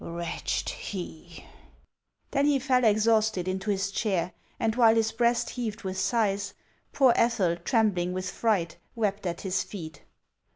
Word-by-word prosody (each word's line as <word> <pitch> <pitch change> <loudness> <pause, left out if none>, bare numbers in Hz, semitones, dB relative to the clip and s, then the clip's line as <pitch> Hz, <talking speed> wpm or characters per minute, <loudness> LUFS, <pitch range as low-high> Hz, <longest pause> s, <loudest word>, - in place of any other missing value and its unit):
Wretched 170 0 -3
he!" 175 -3 -7 0.9
Then 280 0 +2
he 290 -1 +4
fell 255 -1 +2
exhausted 215 -3 +3
into 190 +3 -2
his 195 -1 0
chair, 190 -4 -1 0.3
and 225 -2 0
while 230 -2 +5
his 225 -1 +2
breast 235 +1 +1
heaved 225 -3 -4
with 190 0 -3
sighs, 200 -4 0 0.4
poor 260 -4 +5
Ethel, 200 -8 +2
trembling 180 -2 +1
with 185 0 -3
fright, 195 -8 0 0.2
wept 205 -4 -1
at 170 0 -4
his 190 -1 0
feet. 165 -6 -8
205 Hz, 140 wpm, -27 LUFS, 185-230 Hz, 0.9 s, while